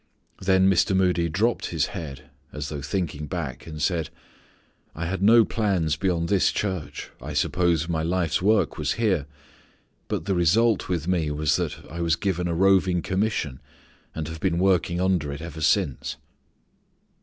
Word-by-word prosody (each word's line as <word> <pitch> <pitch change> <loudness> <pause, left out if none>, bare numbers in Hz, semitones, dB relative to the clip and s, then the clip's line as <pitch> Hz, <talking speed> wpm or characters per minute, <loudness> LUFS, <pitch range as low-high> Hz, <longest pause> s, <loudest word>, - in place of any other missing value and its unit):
Then 95 0 +4
Mr. 95 0 +3
Moody 90 -3 +2
dropped 110 +8 0
his - - 0
head, 70 -5 -7 0.2
as 75 0 -5
though 75 -2 -5
thinking 75 -1 -3
back, 70 -7 -5
and 80 -1 -7
said: 80 +1 0 0.9
"I 85 - -3
had 95 +2 -3
no 115 +2 +6
plans 95 -9 0
beyond 85 -3 0
this 100 -1 +3
church. 95 -7 -4
I - - -6
supposed 85 -3 +1
my 80 -2 -1
life 85 0 0
work 105 -3 +2
was 75 -1 0
here. 95 -11 0 0.8
But 80 - -3
the 100 - 0
result 100 +6 +2
with 85 -3 -1
me 85 -4 +1
was 75 0 +1
that - - -4
I 85 +2 -6
was 85 -1 +2
given 90 -1 -1
a 85 - -1
roving 95 -1 +3
commission 95 -9 -1 0.5
and 80 -1 -3
have 80 0 -7
been 85 -1 0
working 90 -2 +2
under 90 -6 +1
it 70 - -6
ever 80 -1 -7
since." 70 -3 +1
85 Hz, 165 wpm, -25 LUFS, 80-95 Hz, 0.9 s, no